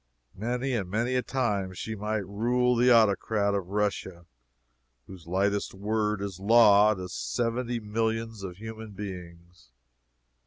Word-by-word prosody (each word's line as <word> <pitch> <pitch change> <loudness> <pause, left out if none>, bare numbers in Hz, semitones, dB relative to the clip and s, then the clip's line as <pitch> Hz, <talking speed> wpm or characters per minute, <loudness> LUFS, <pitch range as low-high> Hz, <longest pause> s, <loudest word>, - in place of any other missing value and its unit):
Many 125 +5 -2
and 100 -7 -2
many 115 +6 0
a 125 - +2
time 105 -9 -1
she 110 - -5
might 105 0 -2
rule 125 +5 +1
the 120 +1 +4
Autocrat 105 -2 +3
of 100 -3 -2
Russia, 95 -3 -2 0.8
whose 90 -4 -12
lightest 100 +3 0
word 105 0 -1
is 95 -3 -5
law 105 0 +6
to 90 -1 -6
seventy 120 +5 -2
millions 115 0 -2
of 90 -2 -7
human 110 0 -8
beings! 90 -7 -9
105 Hz, 130 wpm, -28 LUFS, 95-115 Hz, 0.8 s, law